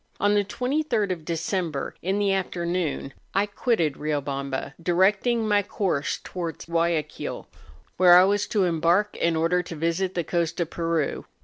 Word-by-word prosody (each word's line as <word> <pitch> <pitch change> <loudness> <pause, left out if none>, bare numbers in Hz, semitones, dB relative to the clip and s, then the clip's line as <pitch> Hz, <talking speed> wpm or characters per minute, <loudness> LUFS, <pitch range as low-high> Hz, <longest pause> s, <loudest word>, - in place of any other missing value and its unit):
On 205 +1 +3
the 205 -1 +3
23rd 250 -2 -1
of 165 -4 -4
December, 165 -2 -2
in 190 +3 0
the 200 -1 +2
afternoon, 175 -6 -2 0.2
I 200 +1 +3
quitted 205 - 0
Kiobamba, 140 -2 -3
directing 200 +7 +2
my 205 -1 +4
course 185 -7 -1
towards 170 -3 -5
G 170 - -16
uayaquil, 165 -2 -1 0.5
where 180 -1 +8
I 180 - +8
was 205 +1 +1
to 205 -3 +1
embark 175 +4 +2
in 170 -1 +1
order 165 +3 +2
to 170 -1 -8
visit 170 +4 -1
the 175 - 0
coast 170 +1 -1
of 170 -2 -1
Peru. 165 -3 -1
175 Hz, 155 wpm, -25 LUFS, 165-200 Hz, 0.5 s, where